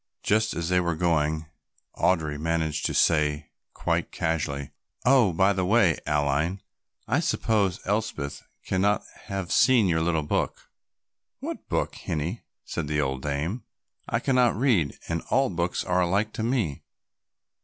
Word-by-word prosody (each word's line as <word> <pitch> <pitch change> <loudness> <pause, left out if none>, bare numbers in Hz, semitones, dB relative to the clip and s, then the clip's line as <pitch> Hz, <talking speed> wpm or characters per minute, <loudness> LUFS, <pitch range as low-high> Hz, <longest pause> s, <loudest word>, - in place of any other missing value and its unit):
Just 110 -2 +2
as 85 +1 -2
they 90 0 +3
were 85 -2 0
going 80 -2 +1 0.5
Audry 75 -5 +1
managed 80 -1 0
to - - -3
say 75 -1 +2 0.2
quite - - -1
casually, 70 -3 -2 0.3
"Oh, 125 -6 +5
by 95 +4 +3
the 95 -1 -1
way, 95 -4 +3
Aline, 75 +5 0 0.4
I - - +2
suppose 100 -5 +1
Elspeth 95 -9 -2 0.2
cannot 100 +3 +1 0.2
have 95 -4 -4
seen 125 -6 +5
your 80 -2 +1
little 80 -2 +1
book." 75 - -2 0.7
"What - - -6
book, - - 0
hinnie?" 80 +8 -3 0.2
said - - -4
the 75 0 0
old 65 -2 -1
dame. 75 - -2 0.5
"I - - +1
cannot 125 -3 +3
read 110 - +2
and 85 0 -1
all 135 -2 +2
books 85 0 -1
are 90 0 +1
alike 100 +5 +1
to - - -4
me." 110 - -1
85 Hz, 145 wpm, -26 LUFS, 75-105 Hz, 0.7 s, Oh